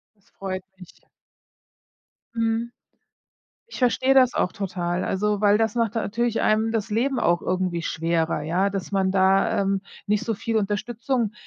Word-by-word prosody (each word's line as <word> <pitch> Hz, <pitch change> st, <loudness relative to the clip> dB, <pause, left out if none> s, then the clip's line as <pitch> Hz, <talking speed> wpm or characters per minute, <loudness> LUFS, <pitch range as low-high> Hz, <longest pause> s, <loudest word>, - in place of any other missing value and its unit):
Das 200 Hz, -, -32 dB
freut 185 Hz, -1 st, -5 dB
mich. 180 Hz, -2 st, -15 dB, 1.3 s
Mhm. 230 Hz, +1 st, -1 dB, 1.0 s
Ich -, -, -8 dB
versteh 260 Hz, +1 st, +3 dB
das 255 Hz, -2 st, +5 dB
auch 180 Hz, -, 0 dB
total, 180 Hz, -3 st, -2 dB
also 210 Hz, +1 st, 0 dB
weil 205 Hz, 0 st, +5 dB
das 220 Hz, 0 st, 0 dB
macht 230 Hz, -1 st, 0 dB
natürlich 230 Hz, +1 st, -1 dB
einem 220 Hz, +1 st, +2 dB
das 225 Hz, -1 st, -2 dB
Leben 245 Hz, +5 st, 0 dB
auch 170 Hz, 0 st, +2 dB
irgendwie 185 Hz, -2 st, -1 dB
schwerer, 165 Hz, -1 st, -1 dB
ja, 180 Hz, +6 st, +1 dB
dass 195 Hz, 0 st, -5 dB
man 190 Hz, -1 st, +2 dB
da, 190 Hz, +1 st, +3 dB
ähm, 195 Hz, 0 st, 0 dB, 0.2 s
nicht 210 Hz, +1 st, +1 dB
so 225 Hz, -, -1 dB
viel 225 Hz, +2 st, -3 dB
Unterstützung 220 Hz, +2 st, -1 dB
205 Hz, 150 wpm, -24 LUFS, 190-230 Hz, 1.3 s, das